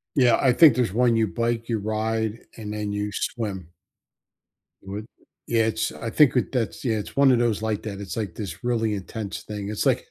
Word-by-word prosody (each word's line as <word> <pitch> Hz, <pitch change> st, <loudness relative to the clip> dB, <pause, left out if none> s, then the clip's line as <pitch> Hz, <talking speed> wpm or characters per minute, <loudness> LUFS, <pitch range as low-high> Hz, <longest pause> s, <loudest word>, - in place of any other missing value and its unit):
Yeah, 125 Hz, -4 st, +5 dB
I 130 Hz, -, +5 dB
think 145 Hz, -1 st, +7 dB
there's 120 Hz, -7 st, +1 dB
one 120 Hz, +1 st, +3 dB
you 110 Hz, -1 st, +2 dB
bike, 115 Hz, +5 st, -2 dB
you 115 Hz, -2 st, 0 dB
ride 110 Hz, +1 st, -1 dB, 0.2 s
and, 105 Hz, -1 st, -6 dB
then 105 Hz, -1 st, -3 dB
you 105 Hz, 0 st, -2 dB
swim. 95 Hz, -9 st, -4 dB, 1.1 s
You 95 Hz, -, -10 dB
would? 105 Hz, +2 st, -5 dB, 0.4 s
Yeah, 115 Hz, -1 st, +2 dB
it's 110 Hz, 0 st, -1 dB
I 115 Hz, -, -5 dB
think 145 Hz, +1 st, +4 dB
with 125 Hz, -, +1 dB
that's 120 Hz, -3 st, -2 dB
Yeah, 110 Hz, -2 st, +1 dB
it's 105 Hz, -, -6 dB
one 140 Hz, -1 st, +6 dB
of 120 Hz, -, +3 dB
those 115 Hz, -3 st, +1 dB
like 110 Hz, -1 st, -2 dB
that, 100 Hz, -2 st, -5 dB
it's, 95 Hz, +1 st, -6 dB
like, 100 Hz, -6 st, -3 dB
this 100 Hz, -3 st, -6 dB
really 115 Hz, -3 st, 0 dB
intense 100 Hz, +1 st, -6 dB
thing, 105 Hz, -1 st, -5 dB
it's 105 Hz, -, -2 dB
like -, -, +1 dB
110 Hz, 215 wpm, -24 LUFS, 105-120 Hz, 1.1 s, think